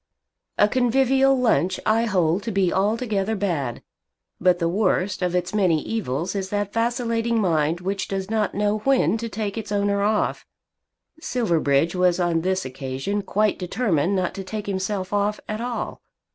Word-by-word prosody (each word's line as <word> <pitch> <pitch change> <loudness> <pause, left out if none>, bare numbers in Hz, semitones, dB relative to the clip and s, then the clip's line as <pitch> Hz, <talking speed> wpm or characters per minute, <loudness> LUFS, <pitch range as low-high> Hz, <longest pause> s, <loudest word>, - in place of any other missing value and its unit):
A 205 - +5
convivial 265 +3 +3
lunch 205 -7 +2
I 225 +2 +3
hold 180 -3 +1
to 230 - -2
be 195 -3 +1
altogether 215 +1 0
bad, 165 - -2 0.6
but 180 0 +3
the 170 -1 0
worst 190 +1 0
of 180 0 0
its 180 +2 -1
many 185 -7 +3
evils 180 - -2
is 195 -2 -3
that 205 0 -2
vacillating 230 0 0
mind 165 -3 +1
which 195 +1 -2
does 195 -1 -3
not 215 -1 -1
know 210 +1 +1
when 265 -1 +2
to 230 0 -4
take 215 0 -3
its 210 -2 -8
owner 200 0 +1
off. 210 +1 0 0.8
Silverbridge 170 - +1
was 180 -1 +2
on 170 -2 +1
this 185 -1 -1
occasion 135 +10 -3
quite 210 +1 0
determined 185 - 0
not 185 -2 -1
to 195 - -6
take 210 +2 -5
himself 190 0 -3
off 205 +1 0
at 215 +1 -4
all. 245 0 -4
200 Hz, 160 wpm, -23 LUFS, 180-220 Hz, 0.8 s, A